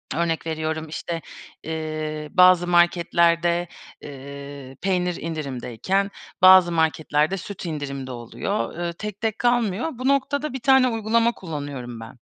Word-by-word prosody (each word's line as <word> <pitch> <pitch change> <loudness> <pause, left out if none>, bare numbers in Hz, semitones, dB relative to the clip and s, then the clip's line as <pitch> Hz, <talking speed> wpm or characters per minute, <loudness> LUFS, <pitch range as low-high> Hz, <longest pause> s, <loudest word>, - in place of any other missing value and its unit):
örnek 165 -1 -1
veriyorum, 160 0 -3
işte, 165 +1 -4 0.4
eee, 155 -1 -4
bazı 180 -1 +6
marketlerde, 175 0 +3 0.3
eee, 140 -1 -9
peynir 180 -2 0
indirimdeyken, 155 - -2 0.3
bazı 185 -2 +8
marketlerde 160 +1 +1
süt 190 0 -8
indirimde 140 -4 -5
oluyor. 120 +2 -4
Eee, 170 -1 -2
tek 210 +3 -7
tek 220 -1 -1
kalmıyor. 240 - +1
Bu 255 +2 -4
noktada 280 +1 0
1 265 - -4
tane 265 +1 +5
uygulama 230 0 +2
kullanıyorum 145 - -6
ben. 115 +3 -11
170 Hz, 120 wpm, -23 LUFS, 150-195 Hz, 0.4 s, bazı